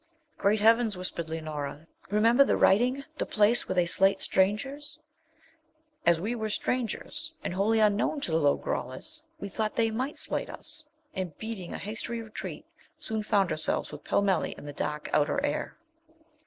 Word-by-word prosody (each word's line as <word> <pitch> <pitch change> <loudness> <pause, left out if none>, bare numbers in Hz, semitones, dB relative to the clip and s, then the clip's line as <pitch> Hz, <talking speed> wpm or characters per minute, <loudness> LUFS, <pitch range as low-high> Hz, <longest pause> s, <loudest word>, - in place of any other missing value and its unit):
'Great 210 +2 +3
heavens!' 225 -1 +4
whispered 170 -3 -4
Leonora, 155 -2 -5 0.2
'remember 230 +6 +5
the - - +1
writing; 250 +7 +4 0.2
the - - +1
place 215 +3 +3
where 185 - 0
they 180 -1 +4
slate 195 +3 +4
strangers!' 270 +10 0 1.1
As 170 -1 +5
we 210 +7 -2
were 220 -2 -3
strangers, 255 +8 -2
and - - -2
wholly 210 +4 +2
unknown 210 +7 +2
to 175 - -2
the 160 - +3
Lo 145 -2 +3
grollas, 300 - -4 0.2
we 200 - -4
thought 215 +2 -2
they 225 -1 +2
might 260 +6 -2
slate - - -2
us, 310 - -7 0.3
and, 185 -5 -4
beating 220 -5 -6
a - - -4
hasty 225 +3 -4
retreat, 220 -1 -7 0.3
soon 220 -1 -2
found 200 -4 +2
ourselves 155 - +1
with - - -9
Pellmelli 195 -4 +1
in - - -10
the 145 - -6
dark 150 +1 -3
outer 150 - +3
air. - - -3
210 Hz, 165 wpm, -28 LUFS, 180-235 Hz, 1.1 s, remember